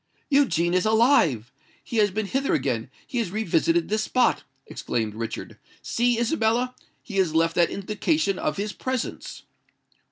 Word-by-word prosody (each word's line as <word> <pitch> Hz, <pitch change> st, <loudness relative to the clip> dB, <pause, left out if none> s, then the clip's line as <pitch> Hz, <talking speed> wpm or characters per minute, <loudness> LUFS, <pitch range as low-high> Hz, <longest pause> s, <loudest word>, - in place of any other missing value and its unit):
"Eugene 180 Hz, -, +3 dB
is 185 Hz, 0 st, +2 dB
alive! 215 Hz, -, +3 dB, 0.3 s
He 235 Hz, -, -5 dB
has 210 Hz, -1 st, +4 dB
been 215 Hz, +2 st, -2 dB
hither 270 Hz, +7 st, 0 dB
again—he 245 Hz, -, -3 dB
has 225 Hz, -6 st, -1 dB
revisited 170 Hz, -4 st, +1 dB
this 215 Hz, +1 st, 0 dB
spot!" 250 Hz, +2 st, +1 dB, 0.2 s
exclaimed 110 Hz, -3 st, -3 dB
Richard. 115 Hz, +1 st, -6 dB, 0.2 s
"See, 240 Hz, 0 st, +1 dB
Isabella—he 235 Hz, -3 st, -2 dB
has 175 Hz, -5 st, +1 dB
left 165 Hz, 0 st, +3 dB
that 170 Hz, -1 st, +3 dB
indication 205 Hz, -, -1 dB
of -, -, -2 dB
his 210 Hz, +1 st, -3 dB
presence." 255 Hz, -2 st, -4 dB
210 Hz, 135 wpm, -25 LUFS, 170-240 Hz, 0.3 s, has